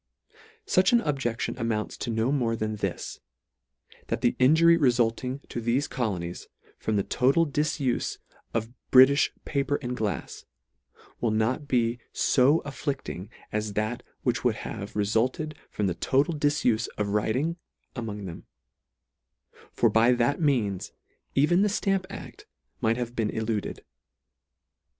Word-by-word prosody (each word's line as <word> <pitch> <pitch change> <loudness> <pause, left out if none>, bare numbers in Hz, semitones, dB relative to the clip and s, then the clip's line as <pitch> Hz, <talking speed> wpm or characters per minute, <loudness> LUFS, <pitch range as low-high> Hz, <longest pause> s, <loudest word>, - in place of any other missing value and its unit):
Such 185 +4 +3
an 235 - +5
objection 135 - -1
amounts 110 -2 -1
to - - -4
no 115 +3 +1
more 120 -5 +1
than 110 -1 -2
this, 100 -3 -4 0.9
that - - -2
the 120 - +2
injury 160 +6 +6
refulting 125 -2 +1
to 120 - -4
thefe 120 +5 +1
colonies, 90 -8 -3 0.3
from 110 - -1
the 100 - +2
total 135 +11 +3
difufe 145 -3 -1 0.3
of 115 +1 -2 0.2
Britifh 135 +2 +7 0.2
pa 140 - 0
per 140 +1 0
and 125 0 -2
glafs, 110 -4 -4 0.7
will 120 - +1
not 115 +7 0
he 120 -1 +1 0.2
fo 140 +5 +4
afflicting 135 - -4 0.2
as 105 -1 -2
that 110 +3 -1 0.2
which - - 0
would - - +2
have 100 +1 -6
refulted 115 +9 0 0.2
from 105 - -2
the 95 - +1
total 140 - +1
difufe 145 -7 +1
of 105 -1 -1
writing 125 +11 0 0.4
among 105 -5 -5
them; 85 -3 -8 1.2
for - - +3
by 115 +2 +4
that 120 +7 +1
means 115 - 0 0.4
even 165 +7 +4
the 210 - +4
ftamp 195 -2 0
act 200 - -10 0.3
might 115 +1 +1
have 120 -1 -4
been 110 -3 0
eluded. 110 -2 -3
120 Hz, 135 wpm, -27 LUFS, 110-140 Hz, 1.2 s, Britifh